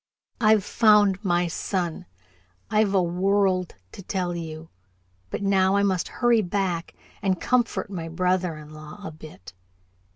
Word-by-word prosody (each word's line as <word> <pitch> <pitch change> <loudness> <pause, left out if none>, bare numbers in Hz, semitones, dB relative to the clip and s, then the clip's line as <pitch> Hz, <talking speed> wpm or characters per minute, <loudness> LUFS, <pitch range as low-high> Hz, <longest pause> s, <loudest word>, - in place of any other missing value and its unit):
I've 215 -3 +4
found 210 -3 +4
my 175 -2 +2
son 170 - -3 0.6
I've 210 -2 +2
a 185 - +4
world 185 +1 +1 0.2
to - - -10
tell 180 -2 -2
you, 160 -1 -7 0.6
but - - -4
now 195 -1 +3
I 200 - +3
must 190 -3 0
hurry 240 -2 +2
back 180 -3 -2 0.3
and 190 -3 0
comfort 240 -4 0
my 165 -4 -5
brother 180 -1 0
in 150 0 -12
law 155 +5 -11
a 160 - -5
bit." 155 -12 -13
185 Hz, 140 wpm, -25 LUFS, 170-200 Hz, 0.6 s, I've